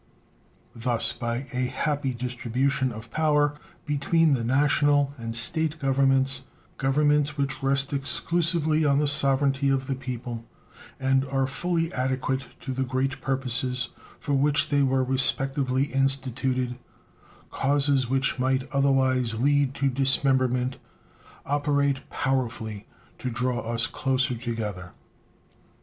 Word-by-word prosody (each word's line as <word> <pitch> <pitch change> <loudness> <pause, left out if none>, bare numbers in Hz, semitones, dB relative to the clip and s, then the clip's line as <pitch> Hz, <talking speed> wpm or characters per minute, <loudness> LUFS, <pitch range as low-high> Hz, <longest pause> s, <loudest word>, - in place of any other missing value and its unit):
Thus 115 0 +2
by 120 +2 -3
a 125 0 0
happy 145 0 -1
distribution 125 +2 -1
of 110 0 -9
power 150 -1 +2 0.3
between 155 +2 +2
the 125 -4 0
National 145 +2 +2
and 115 0 -4
State 160 +7 +1
Governments, 135 -1 +2 0.4
Governments 145 +2 +2
which 140 -1 -2
rest 135 +1 0
exclusively 160 +2 +2
on 140 -2 +3
the 150 - +2
sovereignty 140 -1 +2
of 135 -1 0
the 135 - -2
people 125 -3 -6 0.6
and 135 0 +2
are 135 0 0
fully 165 +4 -2
adequate 130 0 -2
to 130 - -4
the 130 - -3
great 130 +1 -2
purposes 125 -2 -1 0.3
for 145 - -3
which 145 +2 +2
they 145 -1 +2
were 135 -1 +2
respectively 135 0 0
instituted, 130 -2 0 0.7
causes 140 -2 +1
which 135 0 +1
might 130 +1 0
otherwise 130 -4 +2
lead 140 +2 +1
to 140 - 0
dismemberment 130 -1 +1 0.7
operate 140 -1 0
powerfully 115 -6 -2 0.3
to 130 - -3
draw 125 +1 -1
us 115 0 -1
closer 130 0 0
together. 110 -7 -5
135 Hz, 120 wpm, -25 LUFS, 125-140 Hz, 0.7 s, on